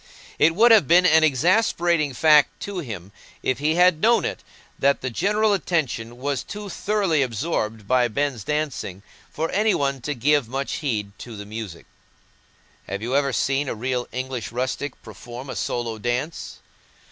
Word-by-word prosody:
It 165 +1 +4
would 230 +4 +6
have 215 - +6
been 180 +4 +5
an 160 -2 +5
exasperating 170 - +2
fact 150 +1 +4
to 200 -2 -4
him, 100 - -7 0.3
if 130 - 0
he 155 +2 +1
had 180 -2 +4
known 235 +1 +4
it, - - -3 0.4
that 140 +1 +2
the 130 - -3
general 210 - +2
attention 135 - -2
was 140 0 -2
too 205 0 -8
thoroughly 195 -6 0
absorbed 110 -4 -2
by 125 0 +3
Ben's 125 -1 -2
dancing 140 -9 -3 0.3
for 160 +1 -3
any 210 +2 +2
one 140 -2 -1
to 145 +4 -3
give 140 0 +2
much 135 +2 -3
heed 110 -9 -2
to 115 -3 -9
the 100 - -7
music. 105 -5 -7 1.0
Have 100 +2 -5
you 125 +3 -1
ever 140 -1 +2
seen 135 +2 0
a - - -3
real 125 +2 -2
English 130 -2 -4
rustic 130 +3 -3
perform 125 +3 -9
a - - -6
solo 115 -2 -3
dance? 125 +8 -3
140 Hz, 165 wpm, -23 LUFS, 120-165 Hz, 1.0 s, would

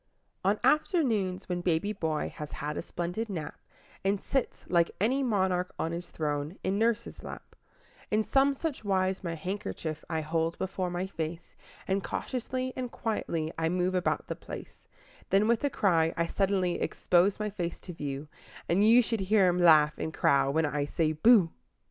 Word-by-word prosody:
On 200 +3 +2
afternoons, 240 - +2
when 180 -1 -2
baby 175 +4 0
boy 160 -5 -2
has 150 -1 -6
had 150 0 -4
a - - -2
splendid 180 +6 -4
nap, 165 -6 -5 0.4
And 195 +1 +1
sits, 270 +4 -2
like 170 -1 +3
any 250 +8 +2
monarch 190 -7 +1
on 165 - -1
his 170 +1 -5
throne, 150 +2 -3
in 195 +2 0
nurse's 230 0 0
lap, - - -10 0.5
In 215 +1 +2
some 275 +4 +3
such 295 -4 -4
wise 190 -1 0
my 170 -2 -3
handkerchief 165 -2 -4
I 160 -1 -1
hold 165 +1 -1
before 190 -1 -2
my 175 +1 -2
face, 165 -2 -6 0.3
And 195 +1 0
cautiously 255 +1 -3
and 250 -2 -4
quietly 165 -8 -2
I 160 0 +1
move 180 +1 0
about 180 -1 0
the - - -4
place; - - -10 0.4
Then, 200 +2 +4
with 235 +2 +2
a 285 - +2
cry, 165 -9 +2
I 170 - +2
suddenly 190 0 0
expose 185 +3 +2
my 210 -1 -2
face 175 -4 -4
to 180 - -8
view, 145 -1 -5 0.4
And 185 +4 +3
you 235 +3 +7
should 225 -1 -2
hear 195 0 +4
him 175 0 0
laugh 155 -3 +6
and 160 - -2
crow 135 -3 +3
when 160 +3 +2
I 145 0 -1
say 155 +1 0
"Booh"! 185 +1 +5
185 Hz, 175 wpm, -29 LUFS, 165-210 Hz, 0.5 s, you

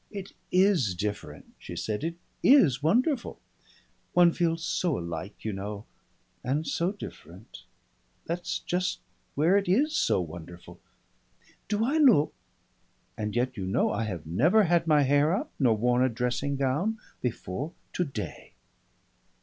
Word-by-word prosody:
"It 200 -2 -8 0.2
is 180 - +3
different," 105 +3 -5
she 85 - -8
said. 105 - -3
"It 165 +1 -2 0.3
is 165 - +5
wonderful. 240 - +1 0.7
One 175 -1 +6
feels 165 -1 0
so 175 -2 0
alike, 85 +5 -6
you 110 - -1
know, 100 +2 -6 0.6
and 145 +5 -1
so 170 +4 0
different. 100 - -11 0.6
That's 175 +1 -2
just 180 +1 -1 0.4
where 165 +7 +4
it 200 -3 -1
is 295 - +2
so - - +2
wonderful. 85 0 -8 0.9
Do 215 +1 +1
I 285 +6 +1
look? 230 - +5 0.8
And 105 0 -4
yet 125 +1 0
you 95 -2 -3
know 95 - +1
I 115 - -1
have 90 -7 -5
never 155 - +4
had 170 -2 +2
my 150 -2 +5
hair 145 +5 +3
up, 290 +9 -4
nor 120 -6 +3
worn 125 +3 +2
a 130 - +3
dressing 125 +4 -1
gown 145 +12 0 0.2
before 125 - -3 0.2
today." 135 - -4
145 Hz, 140 wpm, -28 LUFS, 105-180 Hz, 0.9 s, One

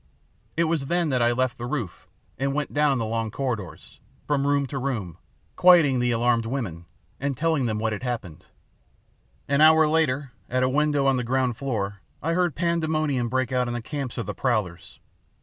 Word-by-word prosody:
It 170 - +4
was 160 -4 -1
then 175 0 +1
that 130 -3 +1
I 120 0 +4
left 125 0 -1
the 120 - -4
roof 125 -10 -4 0.3
and 135 +1 -1
went 150 -1 -2
down 145 -2 +3
the 115 - -1
long 115 0 -2
corridors, 105 - -5 0.3
from 140 -1 0
room 145 -1 +2
to 135 0 -5
room, 115 - -3 0.4
quieting 165 -8 +6
the 125 0 +1
alarmed 115 -1 +1
women 105 -10 -4 0.3
and 140 -1 -2
telling 155 -5 +1
them 110 -1 -1
what 110 0 -1
had 105 - -5
happened. 115 -10 -5 1.0
"An 140 +1 +2
hour 160 0 +7
later, 145 -4 +1 0.2
at 130 +1 +1
a 130 - +2
window 145 0 +1
on 135 -1 +3
the 125 - -1
ground 130 0 0
floor, 100 -7 -3 0.2
I 165 +2 -1
heard 175 -3 +1
pandemonium 155 -6 0
break 130 0 -1
out 125 -1 +1
in 120 - -3
the - - -2
camps 140 -3 -5
of 115 - -3
the - - -4
prowlers. 105 -9 -2
130 Hz, 190 wpm, -25 LUFS, 115-150 Hz, 1.0 s, hour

